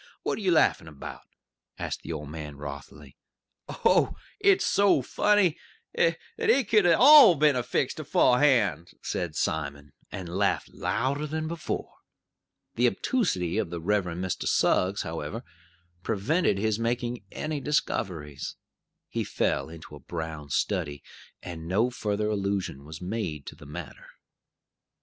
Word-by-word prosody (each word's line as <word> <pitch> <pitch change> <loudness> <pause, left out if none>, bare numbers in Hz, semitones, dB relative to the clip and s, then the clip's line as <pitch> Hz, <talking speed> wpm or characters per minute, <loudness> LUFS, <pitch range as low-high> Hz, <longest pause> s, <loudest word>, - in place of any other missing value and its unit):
What - - -1
are - - -6
ye 190 - +1
laughin' 160 - +3
about?" 75 -3 -9 0.5
asked - - -4
the 85 - -7
old 75 -2 -5
man 75 -2 -7
wrothily. 70 0 -9 0.5
"Oh, - - +2 0.2
it's 400 -1 +4
so 200 -9 +3
funny 200 +3 +2 0.4
that 165 -1 +2 0.2
it 260 -5 +3
could 210 -5 +5
all 255 - +9
'a' - - -7
been 145 -3 +3
fixed - - -1
aforehand!" 115 - +3
said 85 -3 -3
Simon, 70 -2 -3 0.2
and 95 -2 -6
laughed 100 - +1
louder 135 +7 -1
than 155 +1 -3
before. 165 0 -5 0.8
The - - +3
obtusity 100 - 0
of 105 -6 -2
the 85 0 -5
Reverend 90 -1 -1
Mr. 95 - -3
Suggs, 95 +3 +2
however, 80 - -5 0.6
prevented 115 - +1
his 110 +1 0
making 120 0 -2
any 155 -2 -3
discoveries. 90 - -2 0.5
He - - -2
fell - - -1
into 80 -2 -11
a - - -11
brown 80 -3 -6
study, 70 +1 -1 0.4
and 85 -2 -7
no 110 +8 +2
further 105 -2 -2
allusion 100 -8 -2
was 80 +2 -9
made 90 -7 -4
to - - -8
the 75 - -14
matter. 75 0 -9
100 Hz, 135 wpm, -27 LUFS, -, 0.8 s, all